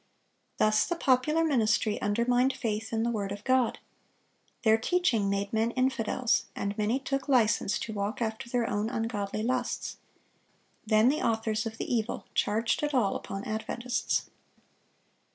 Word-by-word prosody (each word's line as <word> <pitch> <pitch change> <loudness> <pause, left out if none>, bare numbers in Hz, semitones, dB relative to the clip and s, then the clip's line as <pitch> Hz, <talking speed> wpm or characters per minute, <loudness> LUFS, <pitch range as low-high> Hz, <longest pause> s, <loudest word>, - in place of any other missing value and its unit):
Thus 215 0 +3
the 345 - -1
popular 305 +2 +2
ministry 220 -7 +1
undermined 245 +5 +2
faith 220 -2 -3
in 225 -1 0
the 235 - +1
word 200 -3 -2
of 205 +1 -6
God. 255 -2 +2 0.9
Their 220 -1 +5
teaching 235 - +1
made 200 +1 -2
men 220 +1 +2
infidels, 255 -1 +1
and 200 0 -3
many 215 +4 +1
took 275 0 -3
license 220 -6 +3
to 220 - -5
walk 210 +5 -3
after 225 0 -3
their 240 -1 0
own 215 -2 -1
ungodly 215 -3 -2
lusts. 250 +1 -2 0.9
Then 215 +2 +5
the 300 +3 0
authors 220 -1 0
of 220 0 -7
the - - -3
evil 225 -1 -1
charged 225 +2 +1
it 295 -1 -1
all 220 -6 +2
upon 195 0 -5
Adventists. 235 +3 -2
225 Hz, 150 wpm, -29 LUFS, 215-255 Hz, 0.9 s, Their